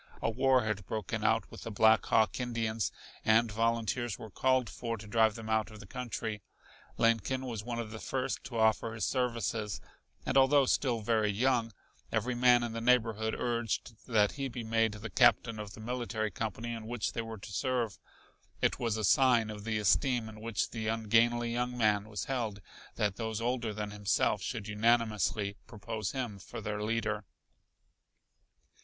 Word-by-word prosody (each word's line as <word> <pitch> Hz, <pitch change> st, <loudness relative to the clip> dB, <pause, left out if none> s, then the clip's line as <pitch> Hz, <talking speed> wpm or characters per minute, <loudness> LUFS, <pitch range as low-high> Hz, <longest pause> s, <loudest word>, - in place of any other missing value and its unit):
A 115 Hz, -, 0 dB
war 130 Hz, +1 st, +3 dB
had 105 Hz, -3 st, -3 dB
broken 110 Hz, -4 st, -3 dB
out -, -, +1 dB
with -, -, -10 dB
the -, -, -5 dB
Black 110 Hz, +1 st, +5 dB
Hawk 110 Hz, +1 st, +3 dB
Indians, 115 Hz, -3 st, -1 dB, 0.3 s
and 110 Hz, +1 st, +4 dB
volunteers 115 Hz, +1 st, 0 dB
were 110 Hz, -3 st, -9 dB
called 130 Hz, 0 st, +2 dB
for 115 Hz, -1 st, -4 dB
to 110 Hz, -, -10 dB
drive 110 Hz, 0 st, +3 dB
them 110 Hz, -1 st, -7 dB
out 110 Hz, 0 st, +1 dB
of 110 Hz, -1 st, -12 dB
the 105 Hz, -, -11 dB
country. 110 Hz, -2 st, -4 dB, 0.6 s
Lincoln 115 Hz, +3 st, +2 dB
was 115 Hz, -4 st, -4 dB
one 120 Hz, 0 st, -4 dB
of 115 Hz, -2 st, -4 dB
the 110 Hz, -, -7 dB
first 130 Hz, +2 st, -2 dB
to 120 Hz, -1 st, -5 dB
offer 110 Hz, 0 st, +2 dB
his 110 Hz, -, -1 dB
services, 115 Hz, -5 st, -1 dB, 0.5 s
and -, -, +1 dB
although 135 Hz, +1 st, +5 dB
still 125 Hz, -3 st, +1 dB
very 110 Hz, -1 st, +2 dB
young, 115 Hz, +2 st, +1 dB, 0.4 s
every 115 Hz, +3 st, 0 dB
man 120 Hz, 0 st, +5 dB
in 120 Hz, -, -2 dB
the 115 Hz, -, -4 dB
neighborhood 115 Hz, -2 st, +2 dB
urged 120 Hz, -1 st, -1 dB
that 105 Hz, -4 st, +3 dB
he 140 Hz, -1 st, -3 dB
be 120 Hz, -2 st, -6 dB
made 115 Hz, -1 st, +1 dB
the 110 Hz, +2 st, -7 dB
captain 115 Hz, -2 st, +4 dB
of 105 Hz, -1 st, -7 dB
the -, -, -12 dB
military 115 Hz, -2 st, -2 dB
company 110 Hz, +4 st, -4 dB
in 110 Hz, -1 st, -7 dB
which 120 Hz, -2 st, -2 dB
they 115 Hz, -, -2 dB
were 115 Hz, -1 st, -7 dB
to 100 Hz, -, -10 dB
serve. 115 Hz, -3 st, -1 dB, 0.6 s
It -, -, +1 dB
was 115 Hz, -2 st, 0 dB
a 110 Hz, -, -2 dB
sign 120 Hz, 0 st, +4 dB
of 105 Hz, 0 st, -8 dB
the 110 Hz, -1 st, 0 dB
esteem 120 Hz, +3 st, +2 dB
in 110 Hz, 0 st, -10 dB
which 115 Hz, -2 st, -2 dB
the 110 Hz, -2 st, -4 dB
ungainly 115 Hz, +2 st, +2 dB
young 125 Hz, +1 st, -1 dB
man 105 Hz, -2 st, +2 dB
was 105 Hz, -4 st, -3 dB
held 115 Hz, -6 st, -2 dB, 0.4 s
that 105 Hz, -2 st, 0 dB
those 110 Hz, -2 st, -3 dB
older 120 Hz, -1 st, -1 dB
than 105 Hz, 0 st, -4 dB
himself 105 Hz, -1 st, +1 dB
should 100 Hz, -, -4 dB
unanimously 105 Hz, -2 st, +1 dB
propose 110 Hz, -2 st, -4 dB
him 120 Hz, -7 st, -4 dB
for 95 Hz, -, -8 dB
their 105 Hz, 0 st, -3 dB
leader. 105 Hz, -1 st, -1 dB
115 Hz, 180 wpm, -31 LUFS, 110-120 Hz, 0.6 s, Black